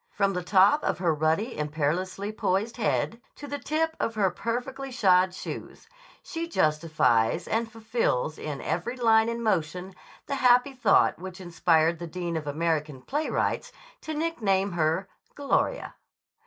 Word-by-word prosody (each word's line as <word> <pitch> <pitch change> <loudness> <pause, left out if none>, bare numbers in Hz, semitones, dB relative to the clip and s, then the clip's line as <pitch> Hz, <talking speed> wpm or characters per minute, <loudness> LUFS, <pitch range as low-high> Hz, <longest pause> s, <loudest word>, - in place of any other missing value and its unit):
From 200 -1 +2
the 180 - -2
top 195 - +4
of - - 0
her 175 -3 +1
ruddy, 160 - 0
imperiously 160 +7 -2
poised 215 +2 -1
head 230 +1 -1
to 290 - -9
the 285 0 -5
tip 320 +2 -1
of 225 - -1
her 195 -4 +2
perfectly 250 +6 -4
shod 185 -6 +4
toes, 185 - -8 0.4
she 335 0 -4
justifies 155 - +1
and 225 0 -1
fulfills 220 - -1
in 145 -3 -5
every 240 +9 -3
line 225 -2 +4
and 235 0 -3
motion 180 -2 -1 0.3
the 280 - -4
happy 250 +2 +4
thought 255 - +3
which 185 0 -8
inspired 170 -2 +2
the 170 - -5
dean 170 0 -4
of 155 -2 -4
American 150 -3 -1
playwrights 295 - -1 0.3
to 315 - -5
nickname 210 -12 0
her 170 +3 0 0.3
"Gloria." 285 - 0
190 Hz, 145 wpm, -27 LUFS, 165-240 Hz, 0.4 s, top